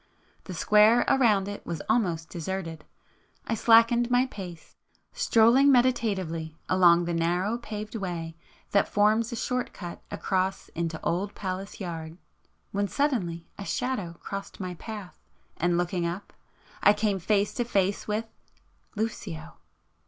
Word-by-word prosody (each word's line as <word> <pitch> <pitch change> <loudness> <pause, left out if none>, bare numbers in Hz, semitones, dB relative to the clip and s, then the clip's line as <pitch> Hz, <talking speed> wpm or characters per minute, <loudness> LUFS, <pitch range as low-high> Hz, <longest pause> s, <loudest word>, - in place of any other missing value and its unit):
The 185 - -6
square 210 +6 +5
around 220 -8 +3
it 205 0 -6
was 165 -3 -5
almost 170 -8 +1
deserted,——I 170 +3 -7
slackened 230 +2 +5
my 245 +1 +4
pace, 180 -9 -9 0.4
strolling 265 - +5
meditatively 195 - +1
along 175 -2 +5
the 170 - -2
narrow 175 +7 0
paved 215 -2 -6
way 175 -6 -4 0.4
that 200 - +3
forms 215 +2 +2
a - - -3
short 250 +2 -2
cut 175 -3 -8
across 190 0 -1
into 165 -1 -3
Old 195 +4 -1
Palace 190 0 -5
Yard,... 165 -3 -6 0.5
when 200 0 0
suddenly 195 - -1
a - - -4
Shadow 205 -7 -2
crossed 195 0 -7
my 185 -2 -4
path, 205 +1 -8 0.4
and 175 +1 +1
looking 175 0 0
up, 180 +4 -6 0.5
I 205 - +7
came 205 -2 0
face 200 +3 +1
to 240 - 0
face 200 -4 0
with——Lucio! 210 -5 -6
195 Hz, 130 wpm, -27 LUFS, 175-225 Hz, 0.5 s, I